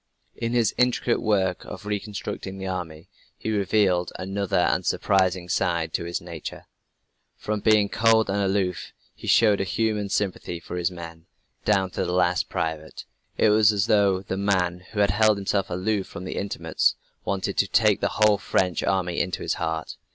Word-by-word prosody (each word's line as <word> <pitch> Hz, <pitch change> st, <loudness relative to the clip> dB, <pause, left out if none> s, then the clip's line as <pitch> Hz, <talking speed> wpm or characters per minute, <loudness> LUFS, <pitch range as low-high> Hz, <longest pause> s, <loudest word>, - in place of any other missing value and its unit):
In 115 Hz, +1 st, -3 dB
his 115 Hz, -4 st, +2 dB
intricate 125 Hz, -1 st, +2 dB
work 95 Hz, -5 st, +1 dB
of -, -, -9 dB
reconstructing 105 Hz, -2 st, -4 dB
the 95 Hz, -, -6 dB
army, 85 Hz, -4 st, -5 dB, 0.3 s
he 110 Hz, -, -3 dB
revealed 100 Hz, -3 st, +1 dB
another, 95 Hz, +1 st, -2 dB
and 90 Hz, -, +2 dB
surprising 95 Hz, -2 st, +1 dB
side 85 Hz, -2 st, 0 dB
to -, -, -2 dB
his 85 Hz, -, -3 dB
nature. 85 Hz, -2 st, -8 dB, 0.7 s
From 105 Hz, 0 st, -3 dB
being 105 Hz, -1 st, +4 dB
cold 110 Hz, +1 st, +3 dB
and 100 Hz, +1 st, -1 dB
aloof, 95 Hz, -2 st, -1 dB, 0.2 s
he -, -, -11 dB
showed 105 Hz, -4 st, +4 dB
a -, -, +1 dB
human 105 Hz, +1 st, -1 dB
sympathy 95 Hz, -4 st, -2 dB
for 85 Hz, -, -8 dB
his 90 Hz, 0 st, 0 dB
men, 85 Hz, -2 st, -10 dB, 0.4 s
down 95 Hz, -3 st, +2 dB
to -, -, -2 dB
the 90 Hz, -, -2 dB
last 90 Hz, -2 st, +1 dB
private. 80 Hz, -1 st, -4 dB, 0.3 s
It 110 Hz, -, +4 dB
was 105 Hz, 0 st, +5 dB
as 100 Hz, -2 st, +1 dB
though 100 Hz, -3 st, +3 dB
the 95 Hz, 0 st, -4 dB
man 90 Hz, -3 st, 0 dB
who 105 Hz, -2 st, 0 dB
had 100 Hz, -2 st, +4 dB
held 110 Hz, +1 st, +3 dB
himself 100 Hz, 0 st, -1 dB
aloof 95 Hz, +2 st, -1 dB
from 90 Hz, +2 st, -8 dB
intimates 100 Hz, +1 st, 0 dB, 0.3 s
wanted 95 Hz, 0 st, -2 dB
to -, -, +3 dB
take -, -, +3 dB
the -, -, 0 dB
whole 105 Hz, -2 st, +4 dB
French 90 Hz, -3 st, 0 dB
army 90 Hz, -3 st, 0 dB
into 90 Hz, -, -2 dB
his -, -, 0 dB
heart. 80 Hz, -1 st, -3 dB
95 Hz, 175 wpm, -25 LUFS, 90-105 Hz, 0.7 s, was